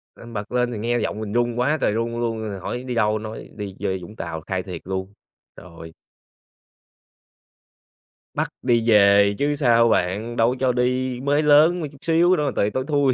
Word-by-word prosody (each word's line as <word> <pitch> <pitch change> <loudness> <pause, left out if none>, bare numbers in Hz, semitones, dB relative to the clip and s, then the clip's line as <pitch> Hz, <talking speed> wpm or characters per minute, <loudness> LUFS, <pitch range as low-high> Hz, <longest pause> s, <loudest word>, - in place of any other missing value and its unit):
À, - - -13
bật 105 0 -5
lên 125 0 0
thì 110 - -5
nghe 120 +3 -1
giọng 105 - -3
mình 105 -1 -5
run 120 0 0
quá 145 +5 +2
trời - - +2
run 115 +1 -2
luôn 115 -1 -2
rồi 105 -3 -5
hỏi: 125 +7 -5
"Đi 125 -2 -4
đâu?" 110 -1 +1
nói: 110 +1 -8
"Đi 100 -2 -6
chơi 95 -1 -2
Vũng 105 +5 -11
Tàu." 80 -6 -5
Khai 95 -1 -2
thiệt 90 -4 -7
luôn. 95 +1 -4 0.4
Rồi. 85 -2 -12 2.4
Bắt - - -1
đi 120 -2 +1
về 100 -1 +5
chứ 145 +1 0
sao 115 -4 +4
bạn, 105 +5 0
đâu 115 +1 +3
có 130 - -3
cho 130 -1 +2
đi. 125 0 -1
Mới 145 +3 +1
lớn 155 +4 +5
mà, 155 - -3
chút 140 - -16
xíu 170 +2 +3
nữa 150 - -1
mà 140 - 0
tời 100 - +1
tối 130 +3 -2
thui 145 -4 +2
115 Hz, 205 wpm, -22 LUFS, 105-130 Hz, 2.4 s, về